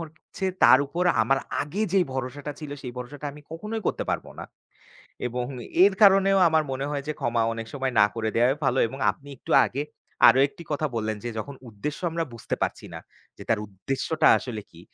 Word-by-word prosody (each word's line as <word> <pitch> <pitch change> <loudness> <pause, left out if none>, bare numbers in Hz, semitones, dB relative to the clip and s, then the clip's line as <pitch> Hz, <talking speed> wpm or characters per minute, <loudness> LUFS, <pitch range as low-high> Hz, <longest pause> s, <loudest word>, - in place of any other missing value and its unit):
হচ্ছে 160 +4 -8 0.2
তার - - +8
উপর 175 +5 -2 0.2
আমার 135 +4 +2 0.2
আগে 180 +9 -3
যে 195 - +4
ভরসাটা 135 +3 -4
ছিল, 150 -2 -7
সেই 125 -2 -6
ভরসাটা 145 +4 -7
আমি 150 - -13
কখনোই 215 +6 -5
করতে - - -1
পারবো - - -3
না। - - -5 0.8
এবং 125 0 -3 0.4
এর 200 - +5
কারণেও 195 0 +6
আমার 160 -1 +3
মনে 135 +1 -3
হয় 140 -1 -2
যে - - 0
ক্ষমা 120 -1 +1
অনেক 115 0 -6
সময় 135 -2 -2
না 105 - +7
করে 110 -1 -2
দেয়াই 125 +4 +3
ভালো। 130 0 +2
এবং 135 - -9
আপনি 145 - -12
একটু - - -11 0.2
আগে 140 +3 -3 0.5
আরো 130 - +6
একটি 170 - -13
কথা 155 +1 0
বললেন 110 -1 -2
যে - - -2
যখন 140 +6 -5
উদ্দেশ্য 115 +8 -5
আমরা 165 0 -1
বুঝতে 115 - -4
পারছি - - -2
না। - - -6 0.4
যে - - -8
তার 110 -2 +2
উদ্দেশ্যটা 135 - 0
আসলে 110 -5 -6
কি? 85 - -15
135 Hz, 195 wpm, -25 LUFS, 120-155 Hz, 0.8 s, তার